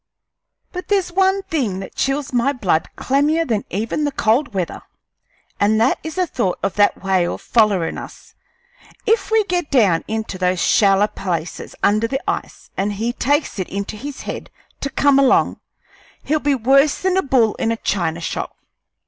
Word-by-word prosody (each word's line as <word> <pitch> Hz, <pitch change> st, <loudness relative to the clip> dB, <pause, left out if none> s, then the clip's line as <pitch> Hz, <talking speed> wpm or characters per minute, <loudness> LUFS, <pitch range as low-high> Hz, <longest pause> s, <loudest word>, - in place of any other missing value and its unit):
But 360 Hz, 0 st, -6 dB
there's 390 Hz, -3 st, +1 dB
one 385 Hz, +2 st, +2 dB
thing 275 Hz, -, -1 dB
that 190 Hz, -, -8 dB
chills 270 Hz, 0 st, -1 dB
my 250 Hz, +3 st, +2 dB
blood 185 Hz, -, 0 dB
clammier 295 Hz, +5 st, +1 dB
than 220 Hz, -6 st, -1 dB
even 225 Hz, -, -2 dB
the 290 Hz, -, 0 dB
cold 240 Hz, +3 st, +1 dB
weather, 185 Hz, -4 st, -3 dB, 0.8 s
and 215 Hz, +2 st, +3 dB
that 230 Hz, +4 st, +2 dB
is 320 Hz, 0 st, -6 dB
the 370 Hz, -1 st, +1 dB
thought 205 Hz, -, -1 dB
of 195 Hz, -, 0 dB
that 205 Hz, -1 st, +2 dB
whale 185 Hz, -2 st, +1 dB
follerin' 205 Hz, -7 st, +1 dB
us. -, -, -12 dB, 0.7 s
If 440 Hz, -3 st, +2 dB
we 440 Hz, -1 st, +3 dB
get 355 Hz, -5 st, -2 dB
down 200 Hz, -, +3 dB
into 220 Hz, -4 st, -4 dB
those 180 Hz, -1 st, +1 dB
shaller 200 Hz, +2 st, +4 dB
places 175 Hz, -5 st, -5 dB
under 215 Hz, +2 st, +3 dB
the 270 Hz, +2 st, -2 dB
ice -, -, -4 dB
an' 195 Hz, +2 st, 0 dB
he 230 Hz, +3 st, -1 dB
takes 285 Hz, -3 st, 0 dB
it 185 Hz, -, -3 dB
into 200 Hz, +2 st, -4 dB
his 275 Hz, +6 st, -7 dB
head -, -, -6 dB, 0.3 s
to 280 Hz, -, -3 dB
come 275 Hz, 0 st, +3 dB
along, 270 Hz, -2 st, +3 dB, 0.6 s
he'll 310 Hz, +1 st, +1 dB
be 290 Hz, -1 st, +1 dB
worse 275 Hz, +4 st, +3 dB
than 375 Hz, 0 st, +1 dB
a 380 Hz, -, +3 dB
bull 245 Hz, -, +2 dB
in 225 Hz, -, +1 dB
a 230 Hz, -, -1 dB
china 170 Hz, -6 st, -1 dB
shop. -, -, -4 dB
235 Hz, 175 wpm, -20 LUFS, 200-290 Hz, 0.8 s, shaller